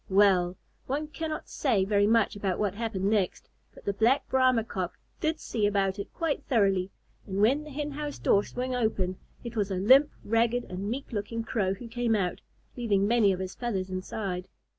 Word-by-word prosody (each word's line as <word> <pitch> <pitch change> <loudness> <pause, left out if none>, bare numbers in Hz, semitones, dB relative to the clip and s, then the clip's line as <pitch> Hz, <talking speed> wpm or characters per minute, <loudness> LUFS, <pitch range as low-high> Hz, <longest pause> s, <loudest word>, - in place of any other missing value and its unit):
Well! 190 -2 +4 0.3
one 295 +3 -2
cannot 315 0 -4
say 220 -9 +1
very 205 0 +3
much 225 -1 +3
about 195 -3 -1
what 205 -3 0
happened 210 -3 -3
next, 205 -3 0 0.2
but - - -16
the 200 - 0
Black 230 +7 +2
Brahma 255 -3 +3
Cock 185 -5 -4 0.2
did 315 0 0
see 215 -3 0
about 200 -1 0
it 200 - -5
quite 325 -4 -2
thoroughly, 195 -6 +2 0.4
and 195 0 -3
when 260 +8 +3
the 305 - -10
Hen 295 +1 -4
house 295 0 -4
door 200 - +3
swung 255 +3 -4
open, 200 -6 0 0.2
it 235 -1 -7
was 205 -2 0
a 190 - -1
limp, 260 +10 +6 0.2
ragged, 230 +2 +2
and 190 +3 -5
meek 270 +5 -4
looking 230 +1 -3
Crow 200 -5 0
who 235 +4 -9
came 230 -1 0
out, 185 -4 -1 0.3
leaving 205 -5 +1
many 225 -3 +4
of 185 - -2
his 185 0 -4
feathers 195 -6 -3
inside. 185 0 -4
215 Hz, 190 wpm, -28 LUFS, 195-245 Hz, 0.4 s, limp